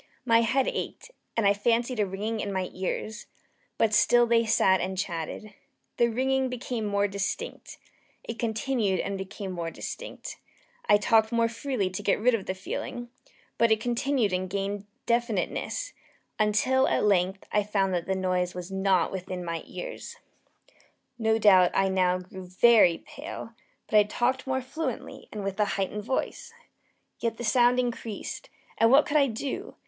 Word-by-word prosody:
My 230 -2 +5
head 255 +4 +2
ached, - - -4 0.3
and 225 - +2
I 200 - +6
fancied 235 +3 0
a 205 - +2
ringing 210 +4 -3
in 205 - -3
my 185 -1 -2
ears: 210 +3 -4 0.5
but 220 -2 +2
still 240 +3 +5
they 230 -1 +2
sat 190 -4 +4
and 190 0 -3
still 185 - 0
chatted. 170 +6 -6 0.4
The 235 - +4
ringing 260 +3 0
became 245 -2 -4
more 200 0 +1
distinct: 200 - -4 0.5
It 230 - -7
continued 225 -3 0
and 200 - -2
became 190 0 -6
more 170 -2 -3
distinct: - - -7 0.5
I 205 - +7
talked 220 +1 +3
more 230 -1 +3
freely 230 -4 -2
to 185 - -4
get - - +1
rid 245 +4 +3
of 215 -4 -2
the 185 - -2
feeling: 240 +5 -5 0.5
but 230 0 +4
it 220 - +4
continued 240 -2 0
and 185 0 -1
gained 200 +1 -3 0.2
definiteness 235 - -1 0.5
until, 215 +5 +3
at - - +1
length, 190 -1 +1
I 210 - +3
found 200 -2 0
that 175 -1 -2
the 190 - 0
noise 180 -1 -1
was 180 +1 -6
not 190 -3 +2
within 185 -1 -5
my 165 -1 -3
ears. - - -7 1.0
No 220 0 +2
doubt 190 -5 +6
I 195 0 +3
now 185 -1 +2
grew 185 0 -10
very 185 -2 +5
pale; 290 -6 -8 0.3
but 215 - +3
I - - +8
talked 245 +6 -1
more 260 0 0
fluently, 270 -1 -5
and 210 -2 -5
with 195 +1 -4
a 210 - +4
heightened 200 +2 -2
voice. 460 - -3 0.6
Yet 230 -1 -2
the - - -6
sound 245 +1 +4
increased 240 - -4 0.3
and 225 - +5
what 275 +4 +6
could 300 - +1
I 280 -2 +4
do? 255 +4 -5
215 Hz, 170 wpm, -27 LUFS, 190-240 Hz, 1.0 s, I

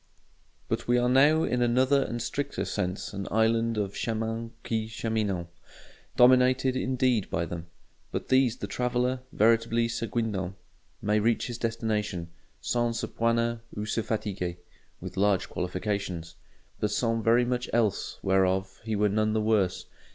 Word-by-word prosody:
But - - -2
we 120 0 +4
are 120 0 +2
now 145 +5 +5
in 125 0 0
another 130 +3 +3
and 120 -3 -3
stricter - - -3
sense 90 +3 -3
an 100 -1 -4
island 115 +1 +2
of 100 -2 -1
chemins 115 0 -2
qui 110 -1 -1
cheminent: 110 -5 -2 0.7
dominated, 130 +1 +5
indeed, 130 -4 +1
by 85 +1 -1
them. 85 0 -6 0.4
By - - -1
these 130 -3 +3
the - - -4
traveller, 125 +1 0
veritably 115 +1 +3
se 115 0 -3
guindans, 100 -6 -2 0.5
may 105 +1 +2
reach 115 +2 +1
his 120 -1 -5
destination 110 -7 -2 0.3
"sans 120 -1 0
se - - -1
poiner 115 0 0 0.2
ou 105 - -2
se 110 +1 -1
fatiguer" 100 -5 -3 0.4
(with - - -8
large 100 -1 +2
qualifications); 90 -2 -3 0.4
but 105 - 0
sans 115 +2 0
very 120 +2 +4
much 125 0 -2
else 115 -3 0
whereof 95 0 +1
he 110 -1 -2
were 105 +1 +3
none 110 +1 +1
the 110 - +2
worse. 105 -4 +1
115 Hz, 150 wpm, -28 LUFS, 100-120 Hz, 0.7 s, now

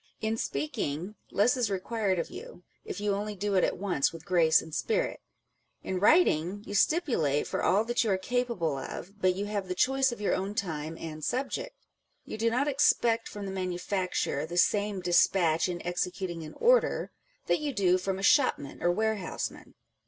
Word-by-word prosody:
In 220 +1 -1
speaking, 150 +1 -3 0.2
less 220 +5 +3
is 245 -4 0
required 195 0 -1
of 170 - -3
you, 180 - -10 0.2
if 185 - -6
you 205 -1 0
only 205 +1 -3
do 205 +1 -2
it 185 - +3
at - - 0
once 180 -7 0
with 165 0 -11
grace 165 -3 +4
and 160 - -10
spirit: 480 - -1 0.6
in 185 - -2
writing, 205 - +3
you - - -7
stipulate 205 - +2
for - - -3
all 205 +4 +3
that 240 +2 +1
you 225 - -1
are 190 - +2
capable 190 - -1
of, 200 +8 -8
but 185 -1 +3
you 200 +2 -3
have 205 -2 -3
the 180 - -3
choice 265 +5 +2
of 240 - -7
your 205 - 0
own 195 +2 -2
time 160 -4 -3
and 155 -1 -7
subject. 265 - -2 0.5
You - - -7
do 230 +1 +2
not 255 +5 0
expect 240 -5 +2
from 205 -1 -7
the 195 - -4
manufacturer 185 -4 -2
the 175 +2 -5
same 205 +1 +2
despatch 175 -1 +3
in 175 -1 -5
executing 180 0 -3
an 155 -1 -9
order - - +2 0.3
that - - +2
you 300 -1 -2
do 185 -6 +2
from 190 +1 -2
a 195 - -6
shopman 255 - +2
or 175 - +3
ware 220 +3 0
houseman. 185 - -6
195 Hz, 190 wpm, -29 LUFS, 175-225 Hz, 0.6 s, grace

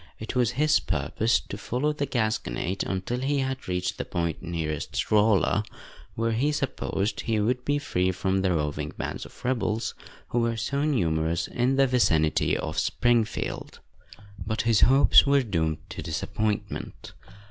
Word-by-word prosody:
It 110 +3 -6
was 125 -2 +2
his 150 +3 +3
purpose 90 - 0
to - - -8
follow 145 +5 -1
the 145 -1 -2
Gasconade 105 - -1
until 95 +6 -2
he 140 +2 0
had 135 -1 -2
reached 90 0 -2
the - - 0
point 85 -2 -2
nearest 80 -4 -3
Rolla, 105 0 +3 0.5
where 115 +1 0
he 130 +7 +1
supposed 115 -7 -2
he 110 -2 0
would 125 +4 0
be 145 +2 +1
free 95 -10 0
from 95 +1 0
the 95 -1 +1
roving 75 -2 -2
bands - - -4
of - - -16
rebels, 115 -3 0 0.4
who 120 - 0
were 115 -1 0
so 140 +5 -1
numerous 85 - 0
in 125 +2 +1
the 135 0 +5
vicinity 85 -12 +2
of - - -3
Springfield. 120 -2 0 0.6
But 110 - -2
his 115 -2 +3
hopes 135 +2 +6
were 140 -1 +4
doomed 80 -8 -2
to - - -6
disappointment. 105 +6 -3
110 Hz, 155 wpm, -26 LUFS, 90-125 Hz, 0.6 s, hopes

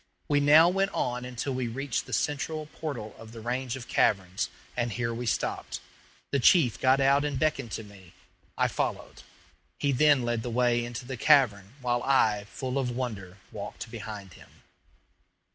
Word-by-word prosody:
We 145 -1 +3
now 150 +3 +7
went 195 +2 +2
on 125 0 -1
until 125 +2 -3
we 130 -1 -2
reached 135 +2 -3
the - - -10
central 155 +2 -1
portal 140 -9 -6
of 115 0 -11
the 115 - -8
range 125 +2 -2
of 130 -3 -8
caverns, 95 0 +1 0.3
and 120 -1 -1
here 115 +1 -2
we 120 +1 -4
stopped. - - -2 0.5
The 140 - +2
chief 130 - +4
got 130 +1 +4
out 140 +1 +4
and 145 -2 -1
beckoned 140 -6 0
to 110 - -4
me. 100 -4 -15 0.4
I - - +3
followed. - - -3 0.6
He 140 - +1
then 140 0 +4
led 120 -1 -1
the 120 - -4
way 120 0 +2
into 120 +1 -6
the 130 0 -5
cavern, 115 -7 +3
while 120 -1 0
I, 110 -7 +2
full 130 +4 -3
of 130 -2 -1
wonder, 110 -7 -5
walked 115 - -7
behind 105 -5 -7
him. - - -16
125 Hz, 175 wpm, -28 LUFS, 115-140 Hz, 0.6 s, now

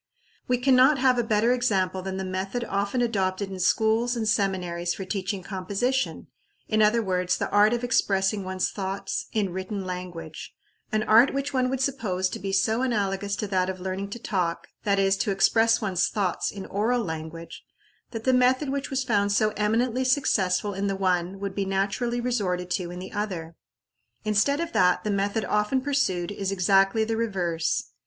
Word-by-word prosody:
We 250 - +2
can 255 +1 +3
not 265 +3 +6
have 255 -1 +3
a - - +2
better 225 +1 +2
example 190 -7 0
than 190 0 -4
the 190 - -3
method 190 +6 -3
often 200 +5 0
adopted 195 -3 -1
in 190 - -6
schools 220 +5 +2
and 225 -2 -2
seminaries 180 -4 0
for 190 - -6
teaching 190 -1 -3
composition; 200 +8 -2 0.4
in 215 -1 +2
other 220 +2 +4
words, 180 -2 0
the - - -3
art 205 +1 +5
of 240 0 -1
expressing 200 -4 +1
one's 185 0 -2
thoughts 195 0 -4
in 205 -4 0
written 190 +2 -4
language 180 -3 -7 0.4
an 215 0 +1
art 230 +6 +5
which 275 +1 -2
one 255 -1 +1
would 265 0 -2
suppose 210 -9 -1
to - - -6
be 195 - -4
so 220 +5 +1
analogous 200 -5 -1
to 210 - -3
that 185 -1 +1
of 185 0 -5
learning 190 +2 -4
to 205 - -6
talk 180 -6 -2 0.2
that 200 -1 +2
is, 195 0 +3
to 200 - -1
express 225 +4 +3
one's 185 -4 +1
thoughts 195 -4 -1
in 195 -2 -8
oral 230 +4 0
language 160 -1 -7 0.5
that 225 -2 -6
the 260 - +3
method 255 +3 +3
which 280 +1 -3
was 265 -1 -1
found 205 -4 +1
so 215 +1 +2
eminently 230 +4 +1
successful 205 -7 +1
in 195 +1 -2
the 195 - -1
one 185 0 0
would 200 -1 -4
be 200 - -1
naturally 200 +5 -1
resorted 185 -8 -1
to 180 -2 -1
in 175 - -7
the 185 +1 -8
other. 180 -6 -4 0.7
Instead 215 +8 +2
of 335 0 -3
that, 180 - +3
the 210 - -1
method 200 +1 0
often 210 +5 +1
pursued 255 -11 0
is 195 -1 -3
exactly 195 +3 +3
the 225 +1 -1
reverse. 180 -8 -1
200 Hz, 185 wpm, -26 LUFS, 185-230 Hz, 0.7 s, not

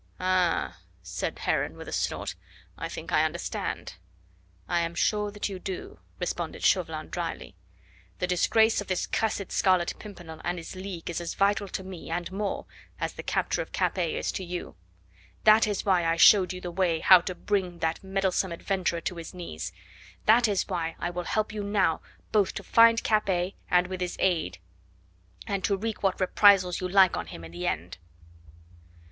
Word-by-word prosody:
"Ah!" 185 -2 +1 0.2
said - - -4
Heron - - -1
with - - -9
a - - -6
snort, - - -2 0.4
"I - - -5
think - - -7
I - - +4
understand." 85 - -3 0.7
"I 175 - +1
am 170 0 -2
sure 210 +2 +1
that 205 0 -3
you 195 -2 -6
do," 185 0 -6 0.2
responded - - -3
Chauvelin - - +1
dryly. - - -4 0.6
"The - - 0
disgrace 220 +5 +3
of 205 - -8
this 185 -2 0
cursed 210 -3 -1
Scarlet 185 -3 +2
Pimpernel 175 -6 -10
and 175 +1 -2
his 170 +2 -8
League 185 -3 -6
is 170 - -3
as 170 - -4
vital 200 +1 +2
to 190 - -5
me, 185 -3 -9
and 175 +2 -3
more, 200 +1 -3 0.3
as - - -2
the - - -7
capture - - -1
of - - -8
Capet - - 0
is - - -1
to 190 - -4
you. 175 0 -6 0.7
That 215 +1 +6
is 205 -2 -2
why 185 -3 +3
I 165 0 +2
showed 185 +2 +7
you 180 0 -6
the 175 - -5
way 170 -2 +1
how 185 -2 +8
to 185 +1 -5
bring 190 -4 -1
that 160 +1 -2
meddlesome 190 -1 0
adventurer 170 -1 -1
to 180 +1 -4
his 165 +1 -8
knees; 80 - -6 0.5
that 235 +2 +6
is 200 -3 0
why 165 -1 -2
I 175 - -3
will 175 0 -4
help 215 0 -1
you 210 -1 -3
now 200 -5 +1 0.3
both 205 -3 +2
to - - -5
find 230 0 +5
Capet 195 -4 +1 0.2
and 180 0 +4
with 185 0 -6
his 180 -1 -2
aid 160 - 0 0.9
and 200 -2 -2
to 200 -2 +1
wreak 220 +2 -4
what 195 -1 +1
reprisals 185 -1 +4
you 185 - -1
like 190 -1 +5
on - - -4
him 85 - -9
in 80 - -11
the 85 +1 -4
end." 85 +3 -3
185 Hz, 185 wpm, -27 LUFS, 175-200 Hz, 0.9 s, how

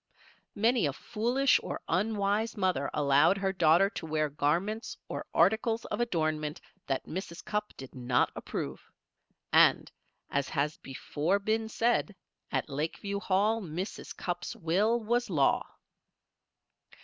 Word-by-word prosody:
Many 225 -3 +3
a 140 - -2
foolish 240 - +2
or - - -5
unwise 205 +4 0
mother 185 -8 +1
allowed 145 +6 +4
her 195 -1 0
daughter 175 +1 +5
to 165 - -6
wear 155 -1 0
garments 170 +10 -1
or - - -5
articles 220 +6 +2
of - - -3
adornment 155 -7 -1 0.3
that 135 -1 -1
Mrs. 170 -1 -6
Cupp 210 0 -3
did 135 -1 -10
not 125 -1 +1
approve. - - -5 0.7
And, - - +5 0.4
as 140 -1 0
has 150 +2 -1
before 150 +7 -1
been 220 +2 -1
said, 225 -2 +1 0.4
at - - -1
Lakeview 165 +8 -3
Hall 205 +4 +1
Mrs. 180 +2 -6
Cupp's 175 -1 -4
will 200 +8 +1
was 240 +2 0
law. 145 -7 +2
190 Hz, 125 wpm, -30 LUFS, 155-220 Hz, 0.7 s, daughter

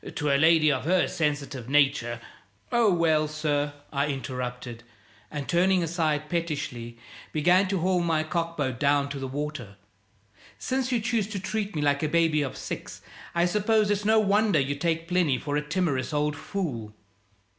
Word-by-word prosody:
To 150 -2 0
a - - +4
lady 155 +1 +5
of 130 -1 -2
her 180 +2 +3
sensitive 145 -5 -2
nature 135 -5 +2 0.3
" 100 0 -37
"Oh, 235 -4 +4
well, 160 -3 +2
sir," 150 -1 -1 0.2
I 140 +1 +1
interrupted 125 -3 -5 0.5
and, 145 -2 -5
turning 180 +1 +3
aside 155 -3 -1
pettishly, 150 -8 -3 0.3
began 175 +5 +3
to 195 +1 0
haul 185 +1 +2
my 165 -2 +1
cockboat 155 -6 -2
down 140 0 +2
to 140 -1 -5
the 135 - -4
water, 135 -6 -5 0.8
"since 260 0 -2
you 245 - +2
choose 225 -2 0
to 205 -2 -4
treat 205 +1 -3
me 150 - -1
like 145 -1 +2
a 155 - 0
baby 165 -2 +2
of 135 -3 -4
six, - - -7 0.3
I 170 0 +3
suppose 210 +3 +2
it's 205 0 0
no 220 +1 +4
wonder 205 -3 +3
you 140 +1 0
take 165 +3 -1
Plinny 175 -7 +2
for 145 +2 -3
a 150 - +1
timorous 150 -4 -1
old 150 0 0
fool." 140 - -4
155 Hz, 170 wpm, -26 LUFS, 140-180 Hz, 0.8 s, lady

